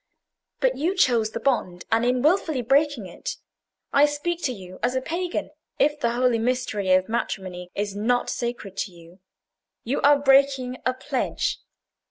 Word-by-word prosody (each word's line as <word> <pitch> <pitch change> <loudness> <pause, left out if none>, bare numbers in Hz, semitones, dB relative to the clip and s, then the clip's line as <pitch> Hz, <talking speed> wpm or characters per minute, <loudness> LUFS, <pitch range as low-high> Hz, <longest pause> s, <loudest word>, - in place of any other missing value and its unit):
But - - +2
you 345 +7 0
chose 235 - +3
the - - -5
bond; 185 -10 -1
and 225 +1 +3
in 250 +1 +1
wilfully 310 -5 +2
breaking 275 -2 +2
it—I 280 +9 -2
speak 330 +4 -3
to 260 - +1
you 185 -5 -10
as 250 +1 0
a - - +2
pagan, 350 +3 -3 0.3
if 295 +1 +2
the 235 -4 +1
holy 245 -1 +2
mystery 225 -5 -1
of 185 0 +3
matrimony 185 -6 -3
is 205 -1 -2
not 245 +4 +1
sacred 235 -5 -4
to 195 - -2
you—you 180 +8 -9
are 290 0 +6
breaking 270 -2 +3
a 255 - +1
pledge. 260 0 -2
250 Hz, 155 wpm, -24 LUFS, 205-280 Hz, 0.3 s, are